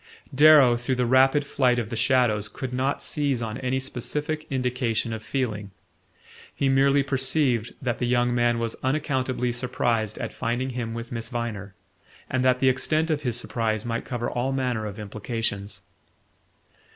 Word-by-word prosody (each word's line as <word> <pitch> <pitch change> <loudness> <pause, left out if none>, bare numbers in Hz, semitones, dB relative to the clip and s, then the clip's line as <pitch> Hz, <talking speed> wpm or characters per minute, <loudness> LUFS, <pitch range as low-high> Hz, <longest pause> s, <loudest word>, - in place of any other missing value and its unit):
Darrow, 145 -4 +7
through 120 +2 -1
the 125 0 +1
rapid 135 +4 +4
flight 125 -3 +2
of 115 -1 -3
the - - -2
shadows, 115 -3 +2
could 125 +4 -6
not 130 +2 -1
seize 140 -4 0
on 110 0 -4
any 130 0 -1
specific 150 +4 -3
indication 125 -3 -1
of 110 - -5
feeling: 110 -4 -3 0.9
he 135 - +1
merely 135 +1 +4
perceived 130 -3 0
that 125 -3 -2
the 125 - 0
young 120 0 +2
man 120 -1 +2
was 115 -1 -2
unaccountably 130 -3 0
surprised 120 -3 -1
at - - -5
finding 120 +3 -2
him 115 -2 -4
with 115 +1 -6
Miss 115 -1 -4
Viner, 110 -6 -4 0.6
and 130 -1 +1
that 130 -1 +3
the 130 - +3
extent 155 +5 +1
of 150 -1 0
his 125 -4 -1
surprise 110 -3 -2
might 115 0 -2
cover 120 -1 -3
all 125 +2 -1
manner 125 -5 -1
of 100 - -7
implications. 105 -1 -4
125 Hz, 165 wpm, -25 LUFS, 115-130 Hz, 0.9 s, Darrow